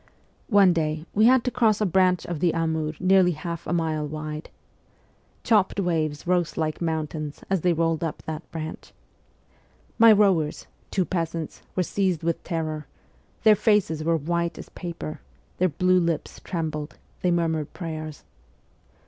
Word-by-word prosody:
One 200 -5 +6
day 155 -1 -1
we 215 +2 +4
had 255 -1 +5
to 250 - -1
cross 225 -4 +2
a 215 - +2
branch 185 -1 +2
of 170 -3 -4
the 170 +1 +2
Amur 160 -2 -1
nearly 185 -1 +4
half 170 +2 -6
a - - -2
mile 160 -3 0
wide. 155 +1 -6 0.9
Chopped 205 -3 +2
waves 160 -5 -1
rose 175 -2 0
like 155 0 -2
mountains 155 -2 -3
as 190 -3 +2
they 180 - +3
rolled 165 0 0
up 165 - -4
that 160 +1 -7
branch. 160 -1 -7 1.1
My 230 0 +9
rowers, 190 -8 +3 0.2
two 185 -2 0
peasants, 165 -3 -3
were 185 - +2
seized 185 -3 0
with 170 0 -1
terror; 155 -3 -3 0.6
their 215 -2 +7
faces 195 -8 +2
were 165 +1 +2
white 170 +2 -1
as - - -9
paper; 170 -3 -6 0.4
their 185 +1 +3
blue 185 +4 +3
lips 170 -3 -2
trembled, 155 -4 -4 0.2
they 180 - +2
murmured 165 -3 0
prayers. 155 -3 -6
165 Hz, 150 wpm, -25 LUFS, 155-185 Hz, 1.1 s, My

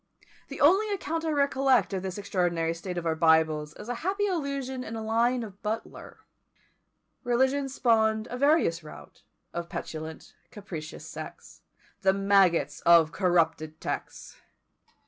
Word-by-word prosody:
The 280 - -8
only 385 +9 +4
account 330 -5 -3
I - - 0
recollect 270 -7 +2
of 190 - -2
this 190 0 -5
extraordinary 175 -4 0
state 175 +2 -6
of 170 - -3
our 165 - +1
Bibles 160 -2 +2
is - - -10
a 245 - -2
happy 395 +4 0
allusion 280 -8 -3
in 225 - -6
a 220 - -5
line 235 +3 +1
of 205 -2 -11
Butler: 220 +2 -6 1.0
Religion 265 +3 +1
spawn'd 220 -3 +2
a - - -3
various 275 - +2
rout, 150 - -13 0.3
Of 170 0 -5
petulant, 160 0 -7 0.2
capricious 170 -7 -8
sects, - - -10 0.4
THE 190 -2 +4
MAGGOTS 195 -3 +3
OF 170 -2 +6
CORRUPTED 165 -4 0
TEXTS. - - -6
210 Hz, 140 wpm, -27 LUFS, 170-265 Hz, 1.0 s, OF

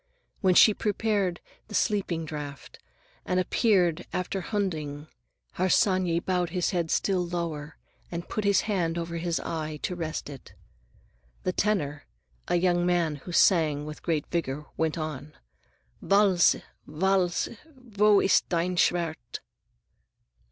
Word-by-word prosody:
When 185 -3 +3
she 215 - +8
prepared 205 -4 -1 0.3
the 210 - -7
sleeping 185 -6 0
draught 145 -2 -8 0.4
and 180 - -1
disappeared 185 -3 +2
after 185 +1 -2
Hunding, 155 -8 -3 0.5
Harsanyi 185 -1 +2
bowed 180 -2 0
his 180 0 -1
head 170 -3 -1
still 185 0 +1
lower 165 -3 -4 0.3
and 170 0 -5
put 215 - -3
his 200 -1 +3
hand 175 -6 -1
over 170 0 -4
his 170 0 -1
eye 155 -2 -4
to 180 - -2
rest 160 -3 -4
it. 140 -3 -11 0.9
The 185 - -1
tenor,—a 145 - -3
young 175 0 +2
man 175 -4 +1
who 175 - -10
sang 155 -5 +3
with 150 0 -8
great 160 -4 -1
vigor, 150 -4 -2
went 160 0 -1
on:— 155 -2 -5 0.7
"Wälse! 195 -4 +4 0.3
Wälse! 185 +5 0 0.4
Wo 210 0 +5
ist 190 - +3
dein 175 +1 0
Schwert?" 165 -9 0
175 Hz, 125 wpm, -27 LUFS, 155-185 Hz, 0.9 s, she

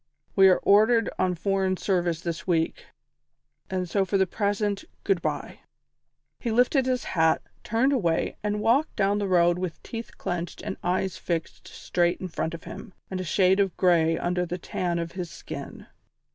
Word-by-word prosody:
We 195 -1 +7
are 185 - +5
ordered 220 +3 +4
on 185 -1 +1
foreign 190 +1 0
service 175 -4 0
this 170 +1 -4
week, 165 -2 0 0.8
and 185 -1 -2
so 195 +3 +1
for 195 +1 0
the 190 - +3
present, 205 +1 -1 0.2
good 195 -4 +1
bye." - - -3 0.8
He 240 - -3
lifted 250 +3 +3
his 255 -1 0
hat, 160 -2 +2 0.2
turned 240 +6 +2
away 170 -10 0
and 210 0 -1
walked 265 +8 +2
down 200 0 +2
the 200 - -1
road 175 -1 +3
with 180 -3 -4
teeth 230 -1 -7
clenched 175 -1 -4
and 200 -2 -3
eyes 185 +1 0
fixed 165 -2 -4
straight 175 -1 0
in 185 - -5
front 165 0 -3
of 165 - -11
him, 195 - -9 0.2
and 185 -1 -2
a - - -3
shade 185 +2 +3
of 195 -3 +1
grey 165 -3 +3
under 180 +1 0
the 175 0 -3
tan 175 0 -2
of 170 0 -3
his 180 -2 -5
skin. - - -8
185 Hz, 175 wpm, -26 LUFS, 175-205 Hz, 0.8 s, We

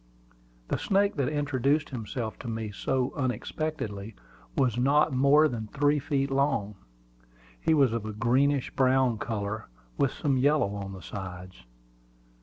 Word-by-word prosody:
The - - 0
snake 200 +1 +2
that 135 -3 +1
introduced 145 0 0
himself 115 -1 -5
to 130 - -8
me 110 -2 -3
so 130 +5 -1
unexpectedly 125 -5 -3 0.4
was 125 -4 +2
not 140 +4 +3
more 140 +4 +5
than 115 -6 -4
three 145 +4 +2
feet 140 -1 -1
long. 135 -7 +1 0.9
He 160 - +3
was 135 -6 +4
of 115 -2 -3
a - - -3
greenish 130 +5 +2
brown 130 -3 +2
color, 110 -1 -3 0.3
with - - +3
some 140 -3 0
yellow 140 -5 +2
on 100 -1 -5
the 95 - -10
sides. 90 -8 -8
130 Hz, 140 wpm, -28 LUFS, 110-145 Hz, 0.9 s, more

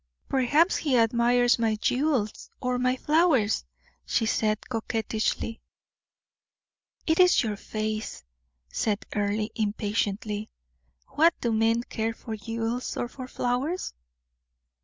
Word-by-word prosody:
"Perhaps 285 +7 +3
he 275 -5 +1
admires 240 +1 +3
my 225 -2 +2
jewels 250 -1 0
or 250 -1 -1
my 255 0 +2
flowers," 295 -7 +2 0.4
she 225 - 0
said, 215 -1 0
coquettishly. 225 -1 -2 1.4
"It 320 +1 +2
is 360 -6 +6
your 215 -2 -2
face," 215 - -4 0.4
said 205 - -1
Earle, 210 +1 0
impatiently. 210 0 -2 0.6
"What 315 +4 +4
do 235 - 0
men 225 +1 +2
care 225 -1 -2
for 225 -1 -6
jewels 225 +3 -3
or 245 - -1
for 255 +1 -8
flowers?" 255 +9 -2
230 Hz, 110 wpm, -27 LUFS, 215-255 Hz, 1.4 s, is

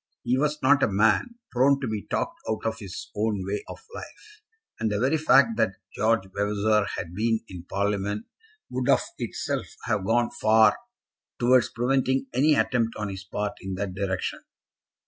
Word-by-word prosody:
He 120 +1 +1
was 150 +2 0
not 140 +2 +5
a - - +4
man 110 - +2 0.2
prone 135 +3 +4
to 135 - -3
be 110 -2 -4
talked 335 0 -2
out 110 - -2
of 115 0 -1
his 95 -3 -8
own 105 -2 -1
way 100 +2 -3
of - - -10
life, 425 -3 -11 0.4
and 110 - 0
the 105 -1 -1
very 135 +6 +2
fact 135 -7 +5
that 110 -4 +1 0.2
George 110 -1 +2
Vavasor 105 +1 +1
had 85 - -5
been 110 +3 0
in 90 -2 -9
Parliament 100 +1 -1 0.5
would 125 +1 -1
of - - +5 0.2
itself - - -3 0.2
have 100 - 0
gone 120 +4 +2
far 110 0 +4 0.6
towards 125 0 +4
preventing 130 +2 +1
any 145 +5 +4
attempt 115 -4 +1
on 105 -1 -3
his 95 0 -6
part 105 +1 -3
in 95 0 -4
that 95 -1 -3
direction. 95 -1 -2
110 Hz, 170 wpm, -26 LUFS, 100-130 Hz, 0.6 s, not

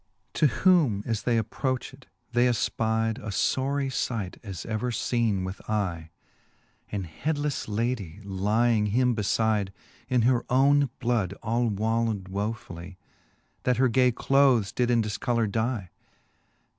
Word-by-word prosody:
To 155 - +4 0.2
whom 150 - +4
as 115 -2 -1
they 120 0 +1
approched, 130 +4 -3 0.2
they 120 +1 +3
efpide 110 -1 0
A 110 - -9
fbrie 135 +6 0
fight, 105 -7 -5
as 95 -6 -7
ever 110 +2 -2
feene 115 -4 0
with 95 +1 -6
eye; 90 -7 -2 0.8
An 100 -2 -2
headlefle 145 - -2
ladie 105 -5 -2
lying 105 +3 +1
him 125 +4 +2
befide, 105 -1 +1 0.4
In 125 -3 +2
her 125 0 +3
owne 140 +2 +4
bloud 115 -6 0
all 115 +2 +1
wallow'd 110 -2 -1
wofully, 95 -3 -5 0.6
That 125 -2 +1
her 130 0 +4
gay 125 +1 +4
clothes 130 -4 +3
did 125 -1 0
in 120 -2 +3
dilcolour 115 +2 0
die. 110 -4 -2
115 Hz, 130 wpm, -27 LUFS, 105-125 Hz, 0.8 s, To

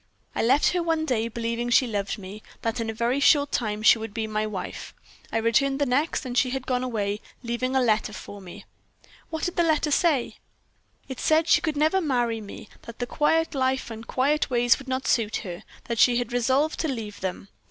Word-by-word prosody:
"I - - -1
left 265 +6 +4
her 355 - 0
one 325 -2 0
day, 230 -6 0
believing 235 +1 -3
she 250 +2 +5
loved 205 -4 -2
me, 200 +1 -9 0.2
that 230 +1 -1
in 225 -1 -2
a - - 0
very 235 +4 0
short 285 0 +4
time 215 -2 -2
she 225 - +6
would 220 -2 -7
be 225 -1 -1
my 215 0 -2
wife. 200 -3 -6 0.4
I - - 0
returned 230 +5 +2
the 285 - +1
next, 280 +4 0
and 245 -1 -5
she 255 +1 +3
had 265 0 -4
gone 250 -1 0
away, 210 -4 -2 0.2
leaving 245 +2 -2
a - - +5
letter 215 -3 +1
for 205 -1 -9
me." 180 -2 -11 0.6
"What 320 -1 -4
did 355 - -2
that 345 - +3
letter 310 -1 +1
say?" 295 -5 +1 0.7
"It 265 - -7
said 315 +1 +3
that - - -6
she - - +5
could 310 -3 -2
never 315 +6 +3
marry 240 -7 0
me; 205 +1 -10
that 230 - -11
the 245 - -2
quiet 325 +5 +1
life 260 -2 0
and 225 +1 -8
quiet 290 +4 +1
ways 245 0 +3
would 270 - -12
not 260 +1 -2
suit 225 -2 +1
her; 175 0 -6 0.2
that 235 -2 -3
she 245 -1 +5
had 245 -1 -3
resolved 260 +6 +1
to 320 - 0
leave 225 -7 -5
them. 190 +1 -4
245 Hz, 220 wpm, -25 LUFS, 220-280 Hz, 0.7 s, she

